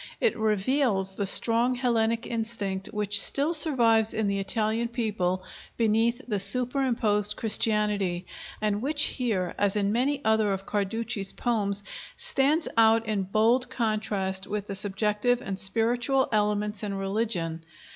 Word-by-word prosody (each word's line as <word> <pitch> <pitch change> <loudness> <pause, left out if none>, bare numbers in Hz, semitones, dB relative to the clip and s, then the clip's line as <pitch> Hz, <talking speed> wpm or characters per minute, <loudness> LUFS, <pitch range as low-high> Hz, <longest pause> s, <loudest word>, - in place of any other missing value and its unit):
It 470 - +1
reveals 215 -1 0
the 195 +1 -3
strong 235 +5 +3
Hellenic 230 -2 0
instinct 220 -4 -3
which 205 -1 +2
still 290 +4 +1
survives 235 -9 +2
in 220 - 0
the 200 0 -1
Italian 220 +3 0
people 205 -6 -2 0.3
beneath 230 +3 +1
the 210 -4 -1
superimposed 230 -2 +1
Christianity, 210 -5 +1 0.3
and 210 -1 -1
which 295 +3 +2
here, 210 -9 -1
as 205 0 +1
in 200 -1 0
many 270 +5 0
other 220 -2 +2
of 195 0 -5
Carducci's 205 0 -2
poems, 205 -4 -1 0.3
stands 295 +4 +1
out 225 0 +4
in 210 -2 -1
bold 230 +6 +2
contrast 210 -5 -2
with 205 -1 -4
the 200 - -6
subjective 210 +4 0
and 195 -5 -5
spiritual 240 +7 +1
elements 210 -1 0
in 205 -2 -4
religion. 195 -5 -2
215 Hz, 135 wpm, -26 LUFS, 200-235 Hz, 0.3 s, out